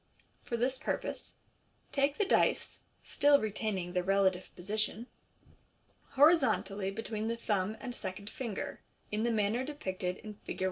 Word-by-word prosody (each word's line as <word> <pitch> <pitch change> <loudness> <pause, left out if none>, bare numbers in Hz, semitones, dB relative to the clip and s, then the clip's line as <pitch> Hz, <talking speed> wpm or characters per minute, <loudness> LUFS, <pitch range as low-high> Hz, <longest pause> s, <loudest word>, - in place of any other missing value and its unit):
For 235 - -3
this 255 +2 0
purpose - - -3 0.6
take 280 0 +2
the 415 - +3
dice - - +2 0.2
(still 285 0 +4
retaining 205 -4 -2
their 180 - +2
relative 190 -1 +2
position) 215 +4 -1 1.1
horizontally 260 - +4
between 220 +1 -3
the 230 +1 -1
thumb 210 -2 0
and 250 -2 -5
second 200 -3 -6
finger, 225 -2 -4 0.3
in 210 +1 0
the 235 +1 +2
manner 220 +3 +1
depicted 190 -10 -3
in 215 -1 -8
Fig. - - -6
215 Hz, 135 wpm, -32 LUFS, 195-250 Hz, 1.1 s, still